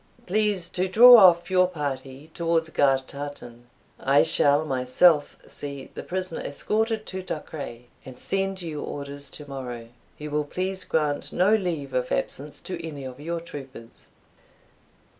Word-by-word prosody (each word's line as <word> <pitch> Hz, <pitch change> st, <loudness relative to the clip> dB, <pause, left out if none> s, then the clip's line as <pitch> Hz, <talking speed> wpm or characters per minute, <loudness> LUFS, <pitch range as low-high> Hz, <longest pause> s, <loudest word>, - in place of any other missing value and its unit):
Please 205 Hz, -2 st, +1 dB
to 185 Hz, +1 st, -1 dB
draw 240 Hz, +6 st, +9 dB
off 175 Hz, -4 st, +6 dB
your 185 Hz, -1 st, +4 dB
party 140 Hz, -3 st, -6 dB
towards 165 Hz, -1 st, 0 dB
Gartartan; 135 Hz, -3 st, -2 dB, 0.3 s
I 140 Hz, +2 st, +4 dB
shall 145 Hz, +2 st, +3 dB
myself 145 Hz, +4 st, +3 dB
see 140 Hz, -2 st, -8 dB
the -, -, -6 dB
prisoner 185 Hz, -2 st, -4 dB
escorted 220 Hz, +8 st, -1 dB
to 190 Hz, 0 st, -6 dB
Duchray, 150 Hz, -8 st, -7 dB, 0.2 s
and 130 Hz, -1 st, -11 dB
send 195 Hz, +2 st, -2 dB
you 155 Hz, -3 st, -5 dB
orders 140 Hz, 0 st, -6 dB
tomorrow. 130 Hz, -5 st, -8 dB, 0.3 s
You 150 Hz, 0 st, -7 dB
will 150 Hz, 0 st, 0 dB
please 185 Hz, +4 st, -3 dB
grant 150 Hz, -2 st, -1 dB
no 185 Hz, +4 st, +3 dB
leave 170 Hz, -10 st, -1 dB
of 125 Hz, 0 st, -1 dB
absence 145 Hz, +2 st, -2 dB
to 185 Hz, -, -6 dB
any 150 Hz, -4 st, -7 dB
of 130 Hz, 0 st, -8 dB
your 165 Hz, +3 st, -4 dB
troopers." 135 Hz, -7 st, -11 dB
150 Hz, 140 wpm, -25 LUFS, 140-185 Hz, 0.3 s, draw